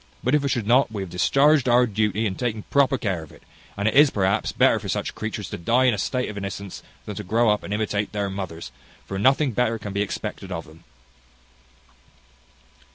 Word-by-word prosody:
But - - +1
if 150 -1 +3
it - - 0
should 120 -6 -1
not, 120 +2 +3
we 100 -3 -4
have 90 - -9
discharged 140 - +3
our 125 +1 +5
duty 110 -1 0
in 100 - -1
taking 110 0 -3
proper 140 -1 +3
care 95 -8 -2
of 80 - -12
it; - - -18 0.3
and 100 +1 0
it - - +2
is, 145 +1 +7
perhaps, 100 -4 0
better - - +3
for - - -7
such - - -2
creatures 110 -2 -5
to - - -5
die 115 +9 +2
in 125 -2 +4
a 105 - -3
state 125 +4 -1
of 105 -1 -6
innocence, 100 0 -6 0.2
than 105 - -6
to 105 - -4
grow 110 +3 +2
up 105 - 0
and - - -8
imitate 105 -1 -1
their 105 -2 -2
mothers; 95 -8 -6 0.3
for 95 - -5
nothing 135 +5 +3
better 115 0 0
can 105 -2 -7
be 100 - 0
expected 95 0 -5
of 85 -2 -4
them." 80 +2 -17
105 Hz, 220 wpm, -23 LUFS, 100-125 Hz, 0.3 s, is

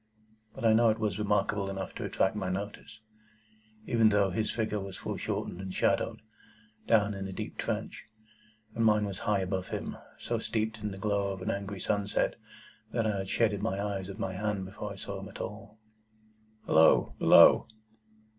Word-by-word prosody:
But 115 - -4
I 110 - +6
know 115 +1 +5
it 110 - +1
was 105 -3 -1
remarkable 105 -1 +1
enough 95 -1 -5
to - - -6
attract 95 +3 +1
my 95 -3 -2
notice, 100 +3 -6 0.8
even 115 -2 +4
though 100 -2 +2
his 110 +4 -1
figure 110 -2 -1
was 95 -1 -7
foreshortened 90 - -4
and 95 -1 -5
shadowed, - - 0 0.6
down 105 -2 +3
in 100 -1 -5
the 95 - -5
deep - - -6
trench, - - -3 0.7
and 115 - 0
mine 105 -1 +4
was 100 -2 -5
high 100 -2 +2
above 95 0 -2
him, - - -4 0.2
so - - -2
steeped 110 0 -2
in 105 0 -3
the 95 - -7
glow 100 0 0
of 95 -1 -8
an - - 0
angry 100 0 -4
sunset, 100 +2 0 0.6
that 115 -1 0
I 105 -2 0
had 95 0 -4
shaded 105 -4 +1
my 95 - -1
eyes 100 -2 -3
with 100 - -7
my 95 -1 -3
hand 100 0 -2
before 100 +2 -6
I - - -7
saw 100 - -6
him - - -8
at - - -11
all. 110 - -7 0.9
"Halloa! 80 +1 +5
Below!" - - +7
100 Hz, 185 wpm, -30 LUFS, 95-105 Hz, 0.9 s, Below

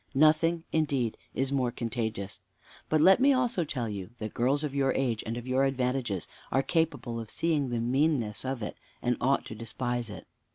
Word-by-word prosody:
Nothing, 160 +3 +4
indeed, 140 -8 +1 0.2
is 135 +1 0
more 130 -3 +2
contagious. 110 -4 -3 0.5
But 155 -1 +3
let 190 +6 +7
me 275 +2 +6
also 245 -8 +2
tell 130 -6 -3
you, 100 -4 -5
that 110 -2 -5
girls 135 +5 +1
of 145 -3 -2
your 135 -1 +2
age, 120 -5 0
and 115 +1 -2
of 120 - -6
your 130 +1 +2
advantages, 125 - 0 0.2
are 135 - +3
capable 160 -9 0
of 115 -2 -7
seeing 155 -3 +1
the 120 -1 -1
meanness 125 -2 +1
of 130 -3 -3
it, - - -5 0.3
and 120 0 +2
ought 135 +2 +2
to - - -7
despise 120 +1 -3
it. 105 - -8
130 Hz, 190 wpm, -29 LUFS, 115-150 Hz, 0.5 s, let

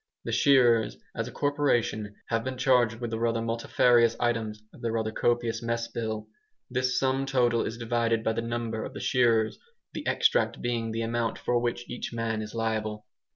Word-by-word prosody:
The - - -4
shearers, 120 -6 +4 0.2
as 115 +1 -3
a - - -7
corporation, 120 -7 0
have 115 -1 0
been 130 0 -4
charged 125 -3 +3
with 120 -2 -4
the 110 - -1
multifarious 115 +1 +2
items 110 -3 -1
of - - -15
their 115 -2 -1
rather 110 -1 -1
copious 120 0 0
mess 115 0 -2
bill. 110 -2 -4 0.4
This 125 0 0
sum 135 +1 +1
total 120 -3 +2
is 115 - -5
divided 115 -1 0
by 110 - +1
the 115 - -2
number 115 -1 -3
of - - -7
the - - -5
shearers, 115 -4 +2 0.3
the - - -5
extract - - +2
being 115 -2 -2
the 115 +1 -2
amount 115 0 -1
for 120 -1 0
which 120 0 -2
each 120 0 -5
man 115 -1 -1
is 110 +1 -7
liable. 110 -2 -2
115 Hz, 180 wpm, -28 LUFS, 115-120 Hz, 0.4 s, shearers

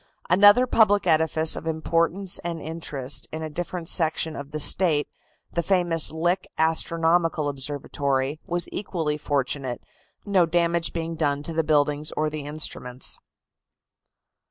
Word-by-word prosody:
Another 205 +6 +6
public 210 -4 +3
edifice 160 0 +4
of 165 - -6
importance 165 +4 0
and 170 -1 -5
interest, 150 -4 -3
in 160 0 -5
a 155 - -5
different 175 +1 -5
section 160 -2 +1
of 140 0 -7
the 155 +1 -5
State, 155 -1 +4 0.5
the 170 - 0
famous 175 -2 +1
Lick 175 +4 -1
Astronomical 165 0 +1
Observatory, 140 0 -2
was 175 0 -1
equally 160 -7 -3
fortunate, 135 -3 -2 0.4
no 190 -4 +3
damage 170 0 +1
being 165 0 -4
done 145 -3 -1
to 165 - -5
the 160 0 0
buildings 150 0 +1
or 155 0 0
the 150 -2 -6
instruments. 130 -4 -2
160 Hz, 130 wpm, -24 LUFS, 150-170 Hz, 0.5 s, Another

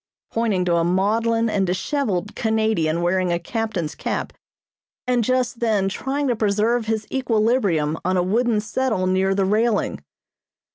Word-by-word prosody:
pointing 215 -6 0
to 170 -1 +2
a 165 - +2
maudlin 225 +6 +1
and 195 -3 0
dishevelled 200 - -2
Canadian 220 -8 0
wearing 180 0 +1
a 170 - +1
captain's 180 -4 -3
cap, - - -3 0.7
and 250 -2 +1
just 250 0 0
then 215 -5 +1
trying 275 +8 -2
to 245 - +1
preserve 220 +2 +1
his 220 -1 -1
equilibrium 215 - +1
on 185 +1 +1
a 180 - +2
wooden 225 +4 +1
settle 220 -2 -1
near 190 +1 +1
the 195 -1 +1
railing. 215 +2 0
215 Hz, 145 wpm, -22 LUFS, 185-230 Hz, 0.7 s, to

